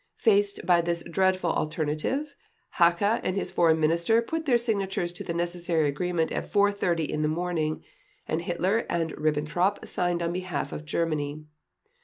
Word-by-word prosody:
Faced 410 -1 +2
by 175 -1 +5
this 170 0 -2
dreadful 185 0 +1
alternative, 155 - -2 0.4
Hacha 180 +6 +3
and 185 - -1
his 195 - -2
Foreign 160 -2 +3
Minister 170 +8 +3
put 320 +5 -4
their 245 -3 +5
signatures 195 -6 -1
to - - -7
the - - -4
necessary 170 -2 0
agreement 165 +3 -1
at - - -4
4:30 200 -6 +2
in 150 - -2
the 150 - +2
morning, 160 -1 -1 0.4
and 160 - -1
Hitler 180 +5 0
and 165 -2 -1
Ribbentrop 155 +6 0
signed 175 -1 -1
on 170 0 -1
behalf 180 -5 -3
of 150 - -6
Germany. 155 -2 -2
175 Hz, 155 wpm, -27 LUFS, 160-190 Hz, 0.4 s, by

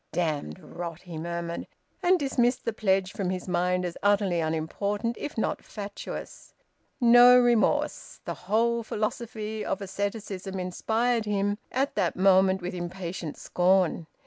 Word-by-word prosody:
"Damned 155 - -2
rot!" 170 -1 -7
he 175 -2 -9
murmured, 170 0 -4 0.3
and 365 0 +4
dismissed 250 -3 +1
the 230 - -1
pledge 195 -2 +1
from 195 -3 -2
his 185 0 -4
mind 180 0 +1
as 175 - -5
utterly 200 -3 +2
unimportant, 200 +8 -1
if 295 - -6
not 220 - 0
indeed - - -24
fatuous. 205 -1 -8 0.4
No 245 0 +8
remorse! 240 -2 +1
The - - -3 0.2
whole 235 +2 +2
philosophy 215 0 -3
of - - -2
asceticism 195 -1 -4
inspired 225 +6 0
him, 205 0 0
at 270 +2 0
that 185 -5 0
moment, 190 0 +4
with 180 - -3
impatient 175 -2 -5
scorn. 180 -2 +2
195 Hz, 140 wpm, -27 LUFS, 180-220 Hz, 0.4 s, No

